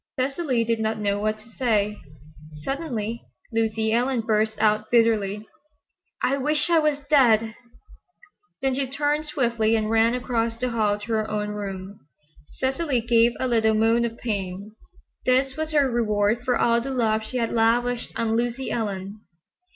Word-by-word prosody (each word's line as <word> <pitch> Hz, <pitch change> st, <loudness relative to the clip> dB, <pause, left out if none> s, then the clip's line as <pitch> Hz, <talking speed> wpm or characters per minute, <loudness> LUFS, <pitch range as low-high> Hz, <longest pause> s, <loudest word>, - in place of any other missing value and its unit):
Cecily 265 Hz, -2 st, 0 dB
did 230 Hz, 0 st, -1 dB
not 220 Hz, 0 st, -1 dB
know 205 Hz, -1 st, -1 dB
what 215 Hz, +1 st, -1 dB
to 215 Hz, +2 st, -16 dB
say. 215 Hz, -4 st, 0 dB, 0.7 s
Suddenly 235 Hz, -, -3 dB, 0.3 s
Lucy 220 Hz, -1 st, 0 dB
Ellen 245 Hz, +1 st, +1 dB
burst 220 Hz, -1 st, 0 dB
out 215 Hz, 0 st, +1 dB
bitterly. 215 Hz, -3 st, +2 dB, 0.8 s
"I 275 Hz, +2 st, +1 dB
wish 300 Hz, +4 st, +1 dB
I 335 Hz, -, +5 dB
was 300 Hz, -2 st, 0 dB
dead!" 230 Hz, -7 st, +4 dB, 1.1 s
Then 265 Hz, -1 st, +2 dB
she 270 Hz, +1 st, -1 dB
turned 295 Hz, +2 st, -1 dB
swiftly 235 Hz, -6 st, +1 dB
and 215 Hz, -1 st, -1 dB
ran 225 Hz, +2 st, +3 dB
across 230 Hz, -2 st, -1 dB
the 250 Hz, +1 st, -2 dB
hall 210 Hz, -3 st, +1 dB
to 210 Hz, +2 st, -5 dB
her 215 Hz, -1 st, 0 dB
own 210 Hz, -1 st, -2 dB
room. 200 Hz, -1 st, -6 dB, 0.5 s
Cecily 265 Hz, 0 st, -1 dB
gave 235 Hz, 0 st, +3 dB
a 260 Hz, -, 0 dB
little 220 Hz, -2 st, +2 dB
moan 225 Hz, +2 st, +3 dB
of 230 Hz, -1 st, -3 dB
pain. 200 Hz, -2 st, -4 dB, 0.6 s
This 260 Hz, +1 st, +2 dB
was 315 Hz, 0 st, -3 dB
her 290 Hz, -3 st, +3 dB
reward 220 Hz, -1 st, +1 dB
for 250 Hz, -1 st, +1 dB
all 235 Hz, 0 st, +2 dB
the 270 Hz, -, -5 dB
love 225 Hz, -4 st, +1 dB
she 220 Hz, +4 st, -5 dB
had 230 Hz, -2 st, -1 dB
lavished 235 Hz, +2 st, +1 dB
on 225 Hz, -1 st, 0 dB
Lucy 240 Hz, +3 st, -2 dB
Ellen. 205 Hz, -2 st, -4 dB
230 Hz, 160 wpm, -24 LUFS, 215-255 Hz, 1.1 s, I